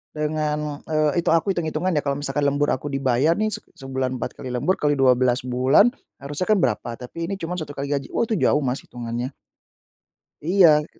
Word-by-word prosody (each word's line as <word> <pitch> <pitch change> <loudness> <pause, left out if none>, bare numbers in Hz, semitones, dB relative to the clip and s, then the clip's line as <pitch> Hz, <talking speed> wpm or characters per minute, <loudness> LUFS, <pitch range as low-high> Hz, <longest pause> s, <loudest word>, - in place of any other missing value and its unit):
dengan, 150 -1 -2
eee, 155 0 +1
itu 170 - -4
aku 180 +4 +1
hitung-hitungan 170 0 -1
ya 155 - +2
kalau 140 -1 0
misalkan 145 0 0
lembur 145 +1 +1
aku 130 +3 -2
dibayar 135 +2 +2
nih, 215 +2 0
se - - +1 0.2
sebulan 130 -1 -3
4 125 - -4
kali 130 - -6
lembur 180 +10 0
kali 145 -1 +2
12 130 -2 +3
bulan, 130 - +4 0.3
harusnya 145 +6 -3
kan 215 - +4
berapa, 120 -2 0
tapi 165 +8 -6
ini 195 - -2
cuman 180 -1 -4
1 150 -3 -7
kali 140 +1 -4
gaji. 140 -2 -1
Oh - - +2
itu 220 -4 -1
jauh 150 - +3
Mas, 130 0 -1
hitungannya. 120 +2 -5 1.1
Iya, 165 -4 +5
145 Hz, 190 wpm, -23 LUFS, 130-165 Hz, 1.1 s, Iya